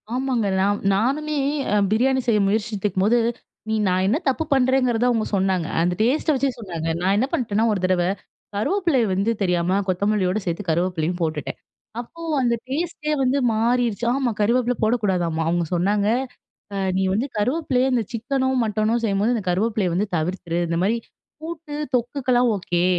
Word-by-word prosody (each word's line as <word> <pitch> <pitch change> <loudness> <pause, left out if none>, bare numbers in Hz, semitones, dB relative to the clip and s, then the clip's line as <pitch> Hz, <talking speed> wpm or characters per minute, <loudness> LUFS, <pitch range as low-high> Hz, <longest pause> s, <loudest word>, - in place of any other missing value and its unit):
ஆமாங்க. 255 -5 0
நான் 205 +2 +1
நானுமே 290 +8 0 0.4
அ - - +3 0.2
பிரியாணி 260 +4 +2
செய்ய 220 -3 +3
முயற்சித்துக்கும்போது, 210 0 +1 0.5
நீ 220 - +1
நான் 185 +1 +2
என்ன 230 +9 +2
தப்பு 270 +4 +1
பண்றேங்கிறத 255 -2 +2
அவங்க 225 -3 +1
சொன்னாங்க. 190 -3 +1
அந்த 175 +1 +1
டேஸ்ட்ட 285 +7 +2
வச்சே 270 +1 +1
சொன்னாங்க. 170 -7 -5
நான் 190 +2 +2
என்ன 255 - +2
பண்ட்டேன்னா 225 -8 0
ஒரு 205 - 0
தடவை, 180 -1 +2 0.5
கருவேப்பிலைய 305 - +1
வந்து 200 +5 +1
தெரியாம, 180 +1 +1
கொத்தமல்லியோட 195 +1 +1
சேத்து 170 +3 -2
கருவேப்பிலையும் 175 +1 0
போட்டுட்டேன். 155 -2 -2 0.4
அப்போ 335 +8 -13 0.2
அந்த 240 -1 +2 0.2
டேஸ்ட்டே 305 +1 -2
வந்து 260 +2 +2 0.2
மாறிருச்சு. 235 0 +1
ஆமா 260 -3 0
கருவேப்பிலை 245 +3 +2
போடக்கூடாதாம்மா. 185 -8 +1
அவங்க 175 0 +1
சொன்னாங்க, 200 +4 +1 0.7
அ - - -3 0.2
"நீ - - +1
வந்து 230 +7 0
கருவேப்பிலைய 260 +2 +1
இந்த 240 - +2
சிக்கனோ, 260 +3 -1 0.2
மட்டனோ, 215 +1 +1
செய்யும்போது 210 +3 +1
இந்த 210 - -4
கருவேப்பிலைய 205 0 0
வந்து 200 +4 +1
தவிர்த்துரு. 170 +1 -2
இந்த 170 0 -1
மாரி 220 +4 +2 0.5
கூட்டு, 320 -2 -7 0.2
தொக்குக்கலாம் 245 0 +1
ஓகே. 175 -2 -1
215 Hz, 150 wpm, -22 LUFS, 185-255 Hz, 0.7 s, அ